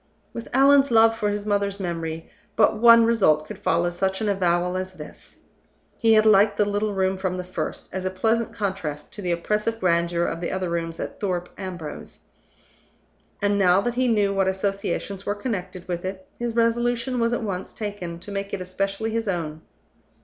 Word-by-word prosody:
With 230 Hz, -, -6 dB
Allan's 275 Hz, +1 st, +5 dB
love 225 Hz, -1 st, +5 dB
for 210 Hz, -2 st, -1 dB
his 205 Hz, 0 st, -3 dB
mother's 200 Hz, -1 st, 0 dB
memory, 165 Hz, -3 st, -4 dB, 0.3 s
but 215 Hz, -, +4 dB
one 230 Hz, +1 st, +7 dB
result 190 Hz, -10 st, +3 dB
could -, -, -9 dB
follow 170 Hz, +1 st, +1 dB
such 190 Hz, +2 st, -1 dB
an 220 Hz, -, -1 dB
avowal 180 Hz, -2 st, +1 dB
as 185 Hz, 0 st, -4 dB
this. -, -, -12 dB, 0.6 s
He 225 Hz, -1 st, +3 dB
had 215 Hz, 0 st, +5 dB
liked 205 Hz, -1 st, +5 dB
the 210 Hz, -, +3 dB
little 205 Hz, 0 st, -1 dB
room 190 Hz, 0 st, 0 dB
from 185 Hz, -1 st, -2 dB
the 180 Hz, -, -3 dB
first, 180 Hz, +1 st, -5 dB
as 190 Hz, 0 st, -3 dB
a 185 Hz, -, 0 dB
pleasant 225 Hz, +5 st, 0 dB
contrast 190 Hz, -9 st, -4 dB
to 205 Hz, -, -7 dB
the 180 Hz, -2 st, -1 dB
oppressive 210 Hz, +6 st, -1 dB
grandeur 170 Hz, -2 st, +1 dB
of 165 Hz, -, -3 dB
the 170 Hz, -, -2 dB
other 185 Hz, -2 st, -2 dB
rooms 165 Hz, -1 st, -3 dB
at -, -, -6 dB
Thorpe 180 Hz, -3 st, -2 dB
Ambrose, 180 Hz, -5 st, -7 dB, 1.2 s
and, 205 Hz, 0 st, +2 dB
now 185 Hz, -1 st, +5 dB
that 240 Hz, +4 st, -1 dB
he 255 Hz, +1 st, +1 dB
knew 205 Hz, -4 st, +2 dB
what 195 Hz, -1 st, +1 dB
associations 195 Hz, 0 st, -2 dB
were 205 Hz, -, -2 dB
connected 185 Hz, -5 st, -5 dB
with 175 Hz, -1 st, -3 dB
it, 190 Hz, 0 st, -5 dB
his 235 Hz, -1 st, -3 dB
resolution 240 Hz, +2 st, +1 dB
was 230 Hz, 0 st, +2 dB
at 240 Hz, -, -1 dB
once 190 Hz, -3 st, -4 dB
taken 205 Hz, -6 st, -5 dB
to 205 Hz, -, -9 dB
make 200 Hz, 0 st, -3 dB
it -, -, -7 dB
especially 195 Hz, +4 st, -2 dB
his 225 Hz, 0 st, -2 dB
own. 160 Hz, -4 st, -3 dB
195 Hz, 190 wpm, -24 LUFS, 180-220 Hz, 1.2 s, one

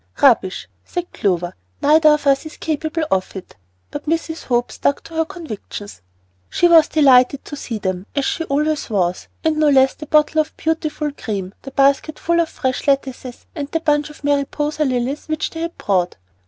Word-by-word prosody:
"Rubbish!" 225 Hz, -9 st, +3 dB, 0.2 s
said 355 Hz, -1 st, -5 dB
Clover. 175 Hz, -3 st, 0 dB, 0.3 s
"Neither 310 Hz, +1 st, +5 dB
of 300 Hz, -1 st, +2 dB
us 275 Hz, +2 st, +2 dB
is 305 Hz, -, -12 dB
capable 315 Hz, +1 st, -2 dB
of 190 Hz, 0 st, 0 dB
it;" 190 Hz, -, -9 dB, 0.4 s
but 290 Hz, +1 st, -7 dB
Mrs. 330 Hz, 0 st, -2 dB
Hope 240 Hz, -1 st, 0 dB
stuck 280 Hz, -, -1 dB
to 330 Hz, -, -13 dB
her 325 Hz, 0 st, +1 dB
convictions. 245 Hz, -, -8 dB, 0.5 s
She 350 Hz, -, +3 dB
was 330 Hz, -3 st, +7 dB
delighted 270 Hz, -3 st, +4 dB
to -, -, -7 dB
see 235 Hz, -5 st, -5 dB
them, 185 Hz, -1 st, -3 dB
as 280 Hz, -1 st, +1 dB
she 330 Hz, -, -1 dB
always 300 Hz, 0 st, 0 dB
was, 185 Hz, -4 st, -1 dB, 0.2 s
and 315 Hz, -1 st, +1 dB
no 305 Hz, -1 st, +4 dB
less 265 Hz, -1 st, +5 dB
the 305 Hz, -, -10 dB
bottle 305 Hz, +1 st, +3 dB
of 310 Hz, -, -8 dB
beautiful 310 Hz, -2 st, -1 dB
cream, 200 Hz, -8 st, -5 dB
the 270 Hz, -, -8 dB
basket 275 Hz, +3 st, +2 dB
full 340 Hz, 0 st, +1 dB
of 330 Hz, -, -2 dB
fresh 260 Hz, +2 st, -3 dB
lettuces, 265 Hz, -3 st, -1 dB
and 290 Hz, -3 st, -5 dB
the 325 Hz, -, -1 dB
bunch 295 Hz, -2 st, +1 dB
of 300 Hz, -, -15 dB
Mariposa 290 Hz, +2 st, 0 dB
lilies 255 Hz, +2 st, -2 dB
which 310 Hz, -1 st, -2 dB
they 325 Hz, -, -6 dB
had 335 Hz, +1 st, -4 dB
brought. 180 Hz, -4 st, 0 dB
290 Hz, 185 wpm, -20 LUFS, 250-310 Hz, 0.5 s, was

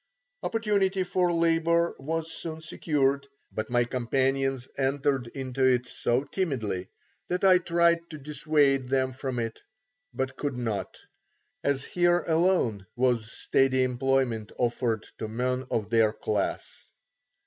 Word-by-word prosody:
Opportunity 200 Hz, -4 st, +1 dB
for 180 Hz, -1 st, +1 dB
labour 170 Hz, 0 st, +2 dB
was 160 Hz, +3 st, -3 dB
soon 160 Hz, -1 st, -5 dB
secured, 140 Hz, -3 st, 0 dB, 0.2 s
but 110 Hz, 0 st, -4 dB
my 120 Hz, 0 st, +3 dB
companions 130 Hz, +2 st, 0 dB
entered 135 Hz, -1 st, 0 dB
into 130 Hz, +1 st, -3 dB
it 125 Hz, -1 st, +4 dB
so 125 Hz, +1 st, 0 dB
timidly 125 Hz, -, -2 dB, 0.4 s
that 180 Hz, +1 st, -2 dB
I 185 Hz, -2 st, +7 dB
tried 170 Hz, -1 st, +2 dB
to 155 Hz, -, -7 dB
dissuade 145 Hz, -2 st, +1 dB
them 130 Hz, -1 st, +1 dB
from 130 Hz, -1 st, -4 dB
it, 115 Hz, -1 st, -3 dB, 0.5 s
but 130 Hz, 0 st, -3 dB
could 140 Hz, -4 st, -2 dB
not, 110 Hz, -5 st, -3 dB, 0.7 s
as 140 Hz, -1 st, +1 dB
here 175 Hz, +1 st, +2 dB
alone 160 Hz, -, +2 dB
was 120 Hz, -3 st, +1 dB
steady 130 Hz, -1 st, +2 dB
employment 125 Hz, -3 st, 0 dB
offered 120 Hz, -2 st, 0 dB
to 110 Hz, -, -3 dB
men 125 Hz, +3 st, -2 dB
of 105 Hz, -1 st, -2 dB
their 115 Hz, -2 st, +4 dB
class. 105 Hz, -2 st, -3 dB
135 Hz, 125 wpm, -27 LUFS, 120-165 Hz, 0.7 s, I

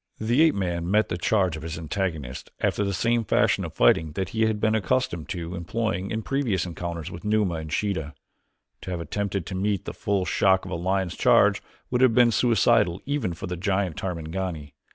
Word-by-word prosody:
The 120 Hz, +6 st, +2 dB
ape 160 Hz, -2 st, +5 dB
man 85 Hz, -3 st, -2 dB
met 105 Hz, +2 st, +3 dB
the -, -, -1 dB
charge 95 Hz, -3 st, +1 dB
of 80 Hz, -, -7 dB
his 80 Hz, 0 st, -5 dB
antagonist 80 Hz, -6 st, -4 dB
after 105 Hz, -, 0 dB
the 100 Hz, -, -1 dB
same 115 Hz, +5 st, +1 dB
fashion -, -, +2 dB
of -, -, -7 dB
fighting 75 Hz, +6 st, +3 dB
that 95 Hz, +1 st, -3 dB
he 110 Hz, +1 st, +1 dB
had 110 Hz, -1 st, -1 dB
been 110 Hz, +1 st, +2 dB
accustomed 105 Hz, -, 0 dB
to 85 Hz, 0 st, -4 dB
employing 95 Hz, +2 st, -2 dB
in 110 Hz, 0 st, -3 dB
previous 125 Hz, -, 0 dB
encounters 85 Hz, -2 st, -5 dB
with 85 Hz, -, -9 dB
Numa 105 Hz, -3 st, +1 dB
and 80 Hz, -1 st, -6 dB
Sheeta. 80 Hz, -7 st, -2 dB, 0.7 s
To -, -, -7 dB
have 90 Hz, -2 st, -3 dB
attempted 100 Hz, +1 st, -3 dB
to 95 Hz, -, -6 dB
meet 100 Hz, 0 st, -1 dB
the -, -, -5 dB
full 100 Hz, -2 st, -1 dB
shock 95 Hz, 0 st, +2 dB
of 95 Hz, -, -7 dB
a -, -, -1 dB
lion's 95 Hz, +1 st, -1 dB
charge -, -, +4 dB, 0.3 s
would 125 Hz, 0 st, +1 dB
have 125 Hz, -4 st, +5 dB
been 120 Hz, -1 st, +6 dB
suicidal 115 Hz, -5 st, +3 dB
even 140 Hz, -11 st, -1 dB
for -, -, -6 dB
the 90 Hz, -1 st, -4 dB
giant 95 Hz, -1 st, -1 dB
Tarmangani. 85 Hz, -4 st, -4 dB
95 Hz, 200 wpm, -25 LUFS, 85-110 Hz, 0.7 s, been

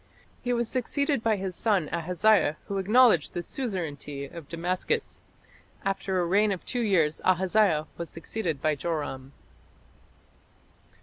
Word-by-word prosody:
He 245 Hz, -, -2 dB
was 235 Hz, -1 st, +1 dB
succeeded 280 Hz, +2 st, 0 dB
by 225 Hz, -2 st, +2 dB
his 190 Hz, -2 st, -4 dB
son 200 Hz, -7 st, +1 dB
Ahaziah, 180 Hz, -1 st, +2 dB
who 200 Hz, -1 st, -2 dB
acknowledged 210 Hz, -, +4 dB
the 175 Hz, -, -2 dB
suzerainty 155 Hz, -, -4 dB
of 150 Hz, +1 st, -10 dB
Damascus. 180 Hz, -, -2 dB, 0.6 s
After 195 Hz, -1 st, -1 dB
a 175 Hz, -, +1 dB
reign 205 Hz, +4 st, +3 dB
of 185 Hz, -, -4 dB
two 245 Hz, -, -2 dB
years 170 Hz, -8 st, +2 dB
Ahaziah 185 Hz, -3 st, +3 dB
was 170 Hz, -, -4 dB
succeeded 165 Hz, -4 st, -4 dB
by 155 Hz, -, +3 dB
Joram. 145 Hz, -4 st, -4 dB
185 Hz, 130 wpm, -27 LUFS, 160-220 Hz, 0.6 s, acknowledged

